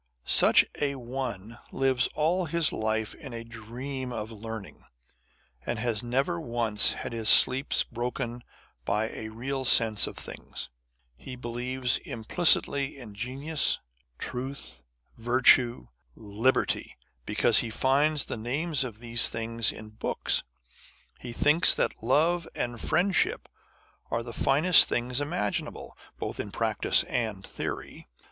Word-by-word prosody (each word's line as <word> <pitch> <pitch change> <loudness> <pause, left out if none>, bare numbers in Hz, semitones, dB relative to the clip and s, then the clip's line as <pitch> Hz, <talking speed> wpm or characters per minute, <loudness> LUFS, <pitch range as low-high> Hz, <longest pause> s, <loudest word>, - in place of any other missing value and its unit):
Such - - +5 0.2
a 140 -1 0
one 120 -3 -6
lives 130 -2 +1
all 170 +4 0
his 165 -1 +2
life 110 0 -2
in 135 -7 -10
a 115 - -7
dream 125 +4 -7
of 110 -1 -6
learning, 110 -1 -9 0.8
and 120 - -4
has 115 -2 -2
never 135 +8 -2
once 115 -5 +2
had - - -6
his 110 -2 +1
sleep 130 +6 +6 0.2
broken 120 0 -5 0.4
by 105 - -1
a 110 - -8
real 130 +4 -5
sense 110 -4 +3
of - - -9
things. - - -6 0.5
He 130 - -9
believes 125 +1 -1
implicitly 140 +2 +2
in 115 -6 -11
genius, 135 +8 0 0.4
truth, 125 - -6 0.4
virtue, 120 - +3 0.3
liberty, 110 - -1 0.3
because - - +4
he 115 - -2
finds 140 +5 +1
the - - -6
names 140 +6 -1
of 120 -5 -7
these 115 0 +2
things 115 0 -1
in 110 - -11
books. 110 - 0 0.8
He 125 - -8
thinks 150 +8 +4
that - - -2
love 160 +8 +1
and 120 -1 -4
friendship 175 +4 0 0.6
are 115 - -2
the 120 0 -9
finest 155 +9 +6
things 125 +3 -1
imaginable, 145 -9 -4 0.2
both - - -6
in - - -4
practice - - +2
and 110 -5 -4
theory. - - -7
120 Hz, 125 wpm, -27 LUFS, 115-135 Hz, 0.8 s, sleep